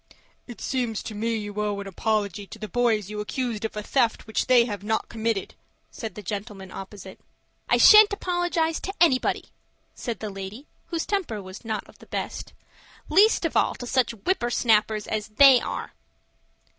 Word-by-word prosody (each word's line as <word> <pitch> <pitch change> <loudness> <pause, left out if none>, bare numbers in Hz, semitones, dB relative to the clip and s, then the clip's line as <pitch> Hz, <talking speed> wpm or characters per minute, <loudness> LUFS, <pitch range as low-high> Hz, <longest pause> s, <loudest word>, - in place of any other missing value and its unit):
"It 240 - -10
seems 240 -5 -2
to 220 - -6
me 225 +2 -1
you 205 -1 -5
owe 205 -1 -1
an 200 - -6
apology 205 0 -2
to - - -10
the 215 0 -6
boys 220 -2 +1
you 210 - -5
accused 230 0 -3
of 220 -1 -4
a 210 - -3
theft 235 -1 +1
which 220 -2 -1
they 250 -2 +6
have 205 -4 -5
not 220 +1 -1
committed," 225 -3 -2 0.4
said 225 -2 -7
the 210 - -8
gentleman 200 -1 -6
opposite. 195 -1 -9 0.5
"I - - +4
shan't 425 0 +9
apologize 350 -4 0
to 390 - -5
anybody," 270 -7 +2 0.4
said 235 -3 -5
the 215 -2 -5
lady, 195 +7 -8 0.2
whose 335 -2 -2
temper 375 - -2
was 185 +2 -10
not 220 -2 -4
of - - -19
the - - -16
best; - - -5 0.6
"least 395 +3 +5
of 325 - -2
all - - +2
to 245 - -7
such 245 -1 +1
whipper 360 -10 +1
snappers 215 -3 +2
as 215 -1 -3
they 255 +3 +7
are." - - -5
220 Hz, 180 wpm, -25 LUFS, 210-255 Hz, 0.6 s, shan't